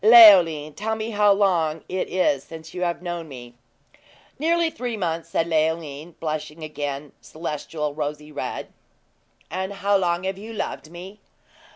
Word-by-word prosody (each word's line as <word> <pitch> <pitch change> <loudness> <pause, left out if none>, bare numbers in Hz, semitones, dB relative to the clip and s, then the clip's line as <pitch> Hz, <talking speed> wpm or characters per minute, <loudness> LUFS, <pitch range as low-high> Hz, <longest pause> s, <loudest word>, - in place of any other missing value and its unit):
"Leoline, 185 -10 +8
tell 220 +6 -2
me 220 +1 -4
how 210 -1 +4
long 170 -6 +2
it 185 0 -2
is 145 -7 +2
since 160 +1 -10
you've 180 -1 -2
known 175 -2 -4
me?" 120 -3 -10 0.9
"Nearly 335 +2 +2
three 245 -7 -4
months," 165 -4 -2
said 165 - +1
Leoline, 160 -1 -1
blushing 155 0 -4
again 145 -2 -4
celestial 150 -1 -4
rosy 150 0 -4
red. - - -5 0.8
"And 190 +1 -2
how 200 +1 +1
long 175 -1 0
have 190 0 -3
you 220 +2 -8
loved 180 -6 -4
me?" 185 +5 -10
170 Hz, 145 wpm, -24 LUFS, 155-200 Hz, 0.9 s, Leoline